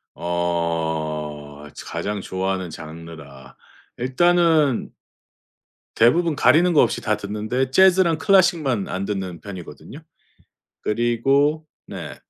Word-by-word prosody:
어. 80 -4 -3
저 - - -10
가장 105 0 -4
좋아하는 95 -1 -3
장르라. 75 -5 -11 0.4
일단은 155 +1 +2 1.0
대부분 160 +8 +3
가리는 170 +5 +4
거 150 - +5
없이 - - 0
다 105 0 0
듣는데 110 +6 -3
재즈랑 185 0 +4
클래식만 165 - +2
안 95 +1 -4
듣는 95 -5 -5
편이거든요. 90 -7 -10 0.8
그리고 135 +7 +1 0.2
네. - - -8
105 Hz, 225 characters per minute, -22 LUFS, -, 1.0 s, 거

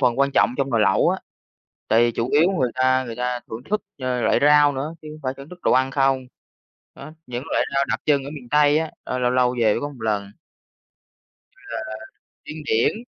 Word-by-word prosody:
phần 125 -2 +2
quan 140 0 +3
trọng 105 +4 +3
trong 135 -1 -1
nồi 115 -3 +2
lẩu 105 - +3
á, - - 0 0.7
tại 115 - +4
vì 120 - +2
chủ 115 +2 -2
yếu 165 +6 +4
người 125 -3 +1
ta 130 0 +2
người 115 -2 -6
ta 125 0 -2
thưởng 110 +2 -6
thức, 210 +1 0 0.2
ờ, 130 -1 -1
loại - - +3
rau 145 0 +5
nữa 140 +4 -4
chứ 155 - -11
hông 155 - -11
phải 130 0 -1
thưởng 140 +2 -11
thức 180 - -12
đồ - - +2
ăn 130 +1 +3
không. 135 -1 +1 0.7
Đó, 145 +3 -10 0.2
những 125 +1 -5
loại - - +2
rau 140 0 +2
đặc - - 0
trưng 140 -2 +2
ở 140 - -6
miền 135 -5 -10
Tây 150 +1 +4
á, 160 0 -2
ơ, 130 - -3
lâu 125 0 +1
lâu 125 0 +2
về 110 -2 +4
mới - - -3
có 145 - -3
một 135 -5 -13
lần. 105 -3 -2 1.2
Như - - -40
là - - -15 0.7
điên 155 0 -8
điển. 150 - +1
130 Hz, 230 wpm, -22 LUFS, 125-145 Hz, 1.2 s, rau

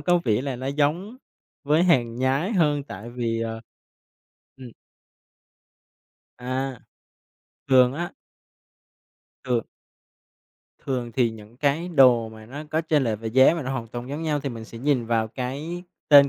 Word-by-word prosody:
có 175 -1 +3
vẻ 115 +2 +2
là 135 -3 -3
nó 130 - -5
giống 150 - 0 0.5
với 155 +4 +3
hàng 120 -10 +3
nhái 135 - +1
hơn 150 -6 +2
tại 115 -2 -8
vì, 115 -2 -2
ờ. 115 0 -3 1.0
Ừm. 130 -3 -10 1.7
À. 130 +1 -3 0.9
Thường 130 -1 +6
á 175 +3 -4 1.3
thường 120 -3 0 1.2
thường 125 -3 -2
thì 120 -1 +2
những 110 +1 -13
cái 150 +5 0
đồ 125 -8 +5
mà 110 -1 -12
nó 140 +6 -7
có 155 - +1
chênh 155 -3 +1
lệch 110 -2 -1
về 115 - -3
giá 130 +7 +6
mà 165 - -3
nó 130 0 -3
hoàn 125 -4 -3
toàn 120 +2 -6
giống 145 +3 -4
nhau 150 -2 0
thì 140 - -3
mình 115 -3 -7
sẽ 115 0 -10
nhìn 130 -2 +1
vào 115 -1 +1
cái 140 +9 -5 0.3
tên 140 -1 +9
130 Hz, 155 wpm, -24 LUFS, 120-145 Hz, 1.7 s, tên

